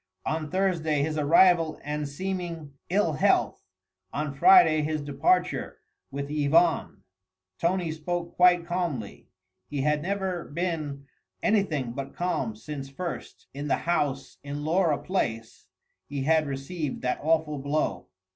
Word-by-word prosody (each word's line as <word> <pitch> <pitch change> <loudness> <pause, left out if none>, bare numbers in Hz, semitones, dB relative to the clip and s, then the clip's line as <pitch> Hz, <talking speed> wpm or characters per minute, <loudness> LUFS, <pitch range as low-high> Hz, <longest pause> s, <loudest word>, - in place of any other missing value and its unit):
On 155 -1 -2
Thursday 165 -6 +1
his 155 +1 -1
arrival 165 +1 +4
and 150 0 -3
seeming 170 -2 -4 0.2
ill 185 -3 +2
health, 145 - +2 0.5
on 150 -1 -3
Friday 360 - +6
his 155 +1 -1
departure 150 +6 0 0.3
with 140 +1 -5
Yvonne. 155 +3 +2 0.6
Tony 175 -1 0
spoke 170 +2 -4
quite 180 -1 +5
calmly. 170 - -3 0.4
He 145 -2 -3
had 150 +1 +1
never 190 -1 -2
been 150 -4 -3 0.4
anything 170 - +1
but 135 +2 -6
calm 155 -11 -1
since 135 +4 -7
first, 170 +6 -6
in 145 +2 -5
the - - +3
house 145 -5 -1
in 145 +1 -5
Laura 165 -2 +2
Place, 115 -13 -3 0.4
he 140 -1 -3
had 155 +1 +3
received 140 +2 -4
that 125 0 0
awful 155 -1 +1
blow. 145 +3 -1
155 Hz, 130 wpm, -27 LUFS, 140-175 Hz, 0.6 s, Friday